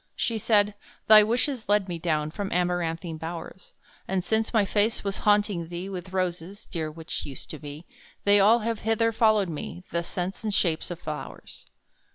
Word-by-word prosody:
She 230 -2 -1
said, 210 -1 +3 0.3
"thy 215 0 +9
wishes 240 +2 0
led 205 -1 +3
me 175 -2 -4
down, 155 -2 0
From 200 +2 -4
amaranthine 175 -2 -1
bowers: 170 +2 -7 0.3
And 190 -1 -1
since 220 0 +1
my 220 -4 +3
face 210 +3 +1
was 200 -1 -2
haunting 205 -5 +2
thee 175 +3 -5
With 185 -1 -7
roses 185 +1 -3
(dear 160 -3 -3
which 160 +1 -6
used 135 -3 -8
to 155 - -7
be), 150 +2 -9 0.4
They 205 0 +5
all 220 +4 +5
have 225 0 -2
hither 225 +1 +1
followed 215 -3 +3
me, 165 +3 -6
The 170 - 0
scents 180 +3 -4
and 215 - -1
shapes 170 -5 +1
of 175 -2 -6
flowers." 155 -2 -8
190 Hz, 180 wpm, -26 LUFS, 170-210 Hz, 0.4 s, thy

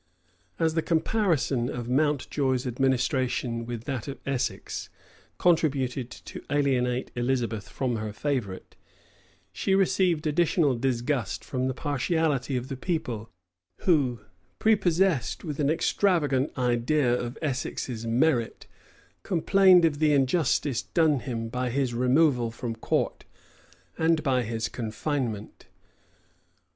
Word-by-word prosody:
As 160 -1 +1
the 160 - +1
comparison 160 - +1
of 120 -3 -5
Mountjoy's 135 -1 0
administration 125 -2 0
with 120 -2 -5
that 130 -1 -4
of 140 - -5
Essex 135 -2 -3 0.5
contributed 140 -7 +1
to - - -10
alienate 130 -3 0
Elizabeth 120 -4 -1
from 125 -3 -2
her 110 -1 -4
favorite, 110 -5 -3 0.8
she 190 - +1
received 185 -4 +2
additional 155 -2 +2
disgust 125 -1 -1
from 130 -1 -2
the 130 - -2
partiality 145 -2 0
of 125 +1 -4
the 135 - -5
people, 130 - -3 0.5
who, 135 - +2 0.4
prepossessed 190 - +2
with 150 -4 -5
an 145 -1 +2
extravagant 155 -5 +1
idea 125 +2 +2
of 120 0 -3
Essex's 130 -5 -3
merit, 120 0 +1 0.6
complained 185 0 +5
of 145 -3 0
the 155 -1 +3
injustice 140 -1 +1
done 155 -4 +2
him 115 -2 -4
by 125 +2 -2
his 130 0 0
removal 125 0 +3
from 115 0 -5
court, 115 - -1 0.8
and 160 -1 +2
by 130 -4 +2
his 115 0 -2
confinement. 115 -3 -4
135 Hz, 115 wpm, -27 LUFS, 120-155 Hz, 0.8 s, complained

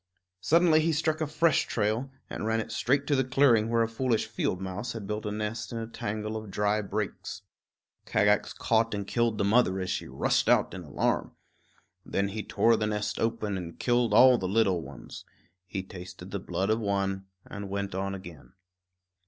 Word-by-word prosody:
Suddenly 160 - +4
he 165 +1 +1
struck 155 +1 0
a 155 - 0
fresh 155 +2 +2
trail 110 +4 0 0.2
and 110 - -4
ran 115 0 +1
it 110 - -4
straight 140 +3 +1
to 145 - +2
the 130 - +3
clearing 125 -4 +3
where 115 0 +3
a - - 0
foolish 115 0 0
field 110 -4 -2
mouse 95 +5 -4
had 110 -3 -6
built 105 +1 -3
a - - -2
nest 105 +2 -4
in 115 - -4
a 115 - -3
tangle 110 -1 -4
of 110 -1 -6
dry 105 +2 +1
brakes. 105 0 -4 0.6
Kagax 105 0 +2
caught 115 -1 +1
and 100 -1 -3
killed 115 +1 0
the 105 - +1
mother 100 -2 +3
as 95 0 -2
she - - -3
rushed 65 +2 +1
out - - +3
in - - -6
alarm. - - -1 0.7
Then 100 0 -1
he 105 +2 -4
tore 115 +2 +3
the 105 - 0
nest 105 0 -2
open 110 -4 -1
and 85 -2 -8
killed 120 -1 +2
all 130 -1 +7
the 95 - -2
little 95 -3 +2
ones. 70 -4 -10 0.4
He 95 +1 -4
tasted 90 0 -10
the 100 - -2
blood 95 +2 -1
of 110 - +2
one 100 -2 -1 0.2
and 100 -1 -7
went 100 0 -3
on 95 +1 -2
again. 85 -2 -11
105 Hz, 195 wpm, -28 LUFS, 95-115 Hz, 0.7 s, all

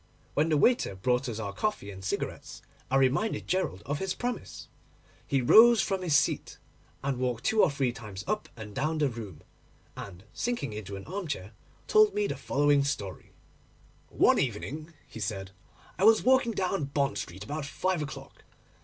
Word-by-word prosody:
When 155 +3 +2
the 155 - +3
waiter 235 - +3
brought 125 +6 0
us 110 - -4
our 100 -3 -4
coffee 105 - -2
and 95 -1 -10
cigarettes 95 - -4 0.3
I 135 - +1
reminded 135 - +2
Gerald 180 - -1
of 145 +1 -2
his 190 -1 -2
promise. 245 0 -5 0.6
He 135 -2 +1
rose 230 - +8
from 195 -1 0
his 170 -5 +1
seat, - - +1 0.5
walked 125 -3 -1
two 220 -1 +3
or 185 - +5
three 140 -3 0
times 105 -5 -8
up 215 +2 -2
and 105 -2 -8
down 155 +7 -1
the 150 -2 +2
room, 105 - -8 0.5
and, 95 -1 -9
sinking 240 - -2
into 100 -2 -6
an 95 - -8
armchair, 155 - -4 0.3
told 430 -1 +5
me 420 0 +1
the - - -2
following 145 0 +2
story:— 105 -10 -4 0.8
'One - - +4
evening,' 155 +4 -3
he - - -10
said, 95 -2 -4 0.5
'I 195 - +4
was 220 0 +6
walking 260 -2 +4
down 185 -5 -1
Bond 140 0 -1
Street 95 +4 -7
about 145 +6 -4
five 185 +3 -1
o'clock. 145 - -8
140 Hz, 170 wpm, -29 LUFS, -, 0.8 s, rose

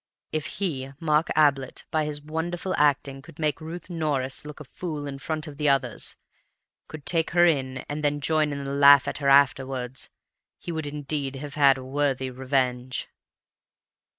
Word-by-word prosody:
If 155 -1 -2
he, 140 -9 -2
Mark 155 -1 +2
Ablett, 140 -4 +2
by 155 -1 +1
his 145 -1 -4
wonderful 170 +4 -3
acting 140 -2 +1
could 145 - -15
make 155 -1 -1
Ruth 165 +2 -7
Norris 150 -6 -1
look 150 0 -9
a - - -7
fool 150 0 -6
in 140 -1 -6
front 155 +2 -3
of 150 -3 -9
the 150 -1 +2
others, 135 -1 0 0.7
could 155 -2 -10
take 165 -2 +1
her 175 - +7
in, 135 -5 0
and 150 +1 -4
then 145 0 +1
join 155 +1 +1
in 140 0 -4
the 140 0 -4
laugh 140 0 +7
at - - -1
her 140 -1 +1
afterwards, 135 -2 +2 0.5
he 175 - -6
would 160 -2 -3
indeed 145 -1 -3
have 145 +1 -7
had 140 -2 +5
a 130 - -8
worthy 135 -1 0
revenge! 130 -1 -1
145 Hz, 175 wpm, -26 LUFS, 135-155 Hz, 0.7 s, her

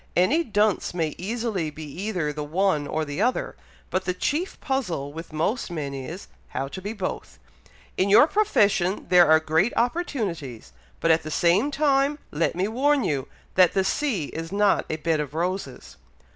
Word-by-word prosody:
Any 275 - +3
dunce 210 - 0
may 160 -3 -1
easily 215 -4 -2
be 155 +1 -9
either 170 0 -3
the 150 0 -4
one 155 -1 0
or 155 0 -1
the 145 +5 -4
other, 250 +3 0 0.4
but 185 0 -1
the 180 - -1
chief 315 - -2
puzzle 180 - -2
with 165 +1 -8
most 165 +11 -1
men 150 -5 -4
is, 140 +8 -7 0.2
how 135 - -3
to 190 - -7
be 205 +3 -4
both. 200 -4 -5 0.6
In 190 - +2
your 210 +8 +8
profession 205 - +2
there 180 -1 +7
are 160 0 +7
great 160 +8 +1
opportunities, 195 - -2 0.3
but 165 - +3
at 160 - +4
the 155 - -7
same 175 - +2
time 285 0 +2
let 160 +3 0
me 185 +3 0
warn 270 +5 +2
you, 140 -2 -1 0.3
that 185 -2 +5
the 190 - +2
sea 205 - -1
is 165 +1 -6
not 200 0 +2
a - - -1
bed 160 0 0
of 150 0 -4
roses." 175 -6 -4
185 Hz, 175 wpm, -25 LUFS, 155-225 Hz, 0.6 s, your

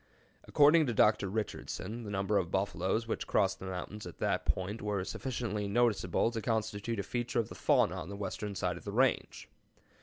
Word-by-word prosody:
According 150 +1 +5
to 120 - -1
Dr. 105 -2 +4
Richardson, 110 +1 -4
the - - -5
number 100 +1 +1
of 85 - -3
buffaloes 95 +4 0
which - - -3
crossed 100 -2 +2
the 95 - -7
mountains 95 +2 -5
at 85 - -10
that - - -1
point 100 +4 -1
were 105 -2 -1
sufficiently 115 -2 -3
noticeable 110 -2 +2
to 115 -1 -3
constitute 110 0 -1
a - - -1
feature 120 +1 -2
of 115 - -1
the - - -7
fauna - - +2
on 80 - -6
the 100 - -5
western 100 +1 -4
side 90 -2 -1
of - - -11
the 100 - -5
range. 130 +3 +1
105 Hz, 190 wpm, -32 LUFS, 95-115 Hz, -, According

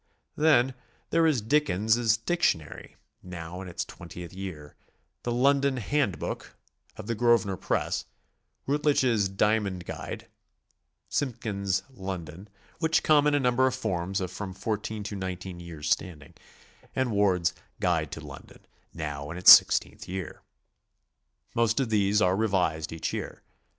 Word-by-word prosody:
Then 145 -4 +4 0.4
there 165 0 +4
is 135 -9 +1
Dickens's 110 -4 +2
"Dic 170 +10 -2
tionary," 80 - -1 0.3
now 90 0 -7
in 95 - -8
its 85 - -4
twentie'di 90 +1 -10
year, 85 -7 -7 0.5
the 120 - -3
"London 140 +2 +2
Hand 125 -3 0
book" - - -6 0.4
of - - -8
the 115 - -1
Gro 120 +1 +4
svenor 95 -3 -5
Press, - - -1 0.6
Routledge's 130 -8 +2
"Diamond 100 -2 0
Guide," - - -7 0.8
Simpkins's 100 -8 -1
"London," 95 -3 -7 0.3
which 160 -1 +2
come 150 -1 +5
in 145 - +3
a - - +3
number 125 0 +3
of 130 - -1
forms 95 -6 -2
of 90 -1 -3
from 95 0 -6
14 105 0 -3
to 105 0 -5
19 95 -1 -5
years 80 -4 -5
standing, 80 -7 -2 0.6
and 130 -2 0
Ward's 95 -4 +2 0.3
"Guide 80 -5 0
to - - -6
Lon - - -10
don," - - -18 0.3
now 75 -3 -5
in 85 - -6
its 90 - +9
sixteenth - - +6
year. 95 -1 -6 1.1
Most 115 0 +2
of 130 -4 -1
these 105 0 +3
are 90 +1 +3
revised 90 -7 0
each 80 0 -3
year. - - -5
100 Hz, 145 wpm, -27 LUFS, 90-120 Hz, 1.1 s, its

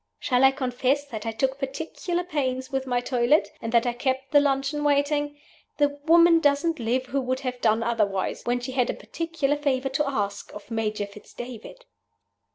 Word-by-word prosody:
Shall 250 0 +1
I 265 - +9
confess 265 +1 0
that 225 -5 -7
I - - 0
took 265 +4 -1
particular 325 - -3
pains 265 -5 -2
with 265 0 -2
my 245 -1 +1
toilet, 245 +4 +2
and 225 - -4
that 235 0 +3
I 240 - 0
kept 260 +2 -2
the 290 - +7
luncheon 280 +1 0
waiting? 290 0 +1 0.4
The 290 -1 +4 0.2
woman 335 0 +7
doesn't 295 +2 +2
live 245 +3 0
who 275 +1 -1
would 255 +1 -2
have 250 -2 -4
done 225 +1 +2
otherwise 210 -5 0
when 245 +1 +1
she 250 +2 -5
had 255 -1 +1
a - - -1
particular 330 -4 -2
favor 270 -2 0
to 275 +1 0
ask 205 -6 -3
of 210 +2 -11
Major 215 -2 -1
Fitz 205 +1 -15
David. 250 - -9
265 Hz, 185 wpm, -25 LUFS, 240-290 Hz, 0.4 s, I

